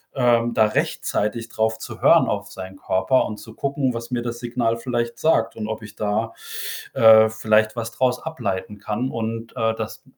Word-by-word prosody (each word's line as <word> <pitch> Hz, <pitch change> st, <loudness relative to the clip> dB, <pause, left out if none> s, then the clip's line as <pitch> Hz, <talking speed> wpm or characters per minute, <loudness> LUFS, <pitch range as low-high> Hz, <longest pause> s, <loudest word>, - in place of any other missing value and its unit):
ähm, 120 Hz, -2 st, +3 dB
da 110 Hz, -, +4 dB
rechtzeitig 110 Hz, +1 st, -1 dB
drauf 110 Hz, 0 st, 0 dB
zu -, -, -9 dB
hören -, -, +6 dB
auf -, -, -3 dB
seinen 95 Hz, 0 st, -8 dB
Körper 95 Hz, +9 st, +1 dB
und 105 Hz, -, -5 dB
zu 110 Hz, +2 st, -12 dB
gucken, 135 Hz, -1 st, -1 dB
was 115 Hz, +1 st, -6 dB
mir 120 Hz, -1 st, -1 dB
das 120 Hz, 0 st, -4 dB
Signal 120 Hz, -1 st, -1 dB
vielleicht 120 Hz, -1 st, -3 dB
sagt 115 Hz, -8 st, +2 dB
und 105 Hz, -1 st, -4 dB
ob 110 Hz, -1 st, -4 dB
ich 105 Hz, 0 st, -11 dB
da, 110 Hz, +2 st, -1 dB, 0.6 s
äh, 110 Hz, -1 st, +7 dB
vielleicht 110 Hz, 0 st, +2 dB
was 115 Hz, +1 st, -3 dB
draus 125 Hz, +1 st, 0 dB
ableiten 105 Hz, -10 st, -4 dB
kann 110 Hz, +6 st, -2 dB
und, 115 Hz, 0 st, -4 dB
äh, 110 Hz, 0 st, +1 dB
dass -, -, -6 dB
115 Hz, 185 wpm, -22 LUFS, 110-120 Hz, 0.6 s, äh